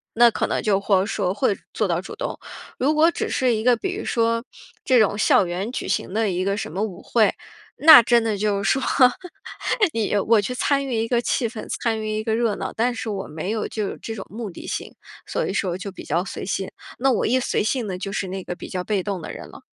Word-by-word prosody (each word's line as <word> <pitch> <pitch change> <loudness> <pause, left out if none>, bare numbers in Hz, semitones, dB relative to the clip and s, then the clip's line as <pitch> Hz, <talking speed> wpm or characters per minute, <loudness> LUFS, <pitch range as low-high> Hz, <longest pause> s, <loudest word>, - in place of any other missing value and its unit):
那 235 0 +6
可 - - -1
能 - - -1
就 200 -2 +2
会 195 -1 +2
说 195 -4 -1
会 200 0 +1 0.2
做 - - +1
到 - - 0
主 435 - -9
动。 - - -4 0.4
如 290 +4 +2
果 320 +3 +5
只 - - -3
是 255 -2 +2
一 220 -1 -1
个 245 0 +4
比 370 +10 -3
如 - - -5
说 230 0 +1 0.4
这 255 - +4
种 205 -1 +3
校 205 -2 +4
园 180 +6 -3
举 - - -4
行 - - -1
的 220 +1 +1
一 180 +1 -1
个 200 +1 0
什 210 - -4
么 190 +5 -3
舞 195 -5 -4
会， 225 -3 +2 0.4
那 315 -4 +10
真 235 0 +3
的 220 -3 -1
就 200 -1 0
是 265 - +2
说， - - -6 1.1
你 220 -2 0
我 220 +2 +4
去 230 +5 -3
参 275 +2 +1
与 250 - -3
一 225 0 0
个 240 0 +2
气 235 -1 0
氛， 220 - -8
参 225 -2 -1
与 215 - -3
一 215 0 -2
个 220 -1 0
热 225 -3 +1
闹， - - -4
但 240 +2 +1
是 225 - -5
我 195 -2 -4
没 160 +5 -5
有 220 -1 -1
就 210 -3 -3
有 - - -7
这 225 - -6
种 195 - -6
目 220 0 -6
的 - - -10
性， - - -5 0.3
所 - - -2
以 - - -2
说 185 -3 -1
就 195 +1 -6
比 185 - -10
较 170 +4 0
随 195 - -6
性， 190 0 -2 0.3
那 270 +1 +3
我 225 - +1
一 255 +3 +2
随 250 - 0
性 235 0 -1
那 185 - -4
就 195 +1 -5
是 195 -1 -2
那 190 0 -5
个 175 - -5
比 - - -9
较 180 -1 -3
被 205 0 0
动 195 -3 -3
的 - - -6
人 - - -9
了。 - - -14
215 Hz, 275 characters per minute, -23 LUFS, 195-235 Hz, 1.1 s, 那